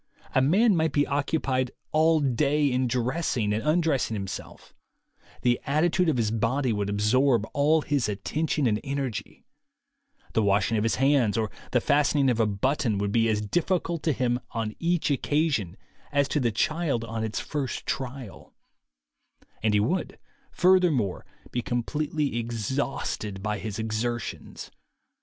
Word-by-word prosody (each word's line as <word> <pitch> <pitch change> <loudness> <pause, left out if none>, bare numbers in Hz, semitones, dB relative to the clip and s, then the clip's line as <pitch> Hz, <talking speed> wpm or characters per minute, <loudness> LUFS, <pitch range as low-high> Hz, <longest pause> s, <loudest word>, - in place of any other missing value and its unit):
A 130 - +4
man 195 - +4
might 160 -1 +1
be 145 0 +3
occupied 140 -2 0 0.2
all 160 +1 +4
day 145 +3 +2
in 125 0 +1
dressing 125 -3 0
and 110 - -1
undressing 155 -6 +1
himself; 95 -2 -7 0.7
the 120 -1 +2
attitude 165 +4 +2
of 145 - +1
his 110 -3 +1
body 120 +3 0
would 100 -1 -2
absorb 115 +4 +2
all 150 +2 +3
his 140 -6 0
attention 150 +9 -1
and 105 -3 +2
energy; 135 -4 -4 0.9
the 110 - +2
washing 100 +2 +2
of 105 - +1
his 115 +1 +1
hands 135 -6 +2
or 110 -2 -1 0.2
the 125 - +3
fastening 145 0 +3
of 120 - -1
a 110 - +3
button 110 +2 0
would 100 0 -1
be 115 +1 +2
as 105 -1 +1
difficult 170 - -1
to 160 - +1
him 125 -3 0
on 110 -2 -3
each 170 -2 +1
occasion 140 - 0 0.3
as 140 -1 +2
to 150 - +1
the 120 -4 +1
child 150 +1 0
on 115 -1 -4
its 110 -2 -2
first 140 -4 -4
trial; 130 -4 -6 1.1
and 105 0 +2
he - - +4
would, 165 - -1 0.3
furthermore, 175 - +2 0.2
be 120 - -1
completely 145 +2 -2
exhausted 115 -3 -3
by 105 -1 -2
his 105 -1 -5
exertions. 110 +2 -4
130 Hz, 145 wpm, -26 LUFS, 110-150 Hz, 1.1 s, A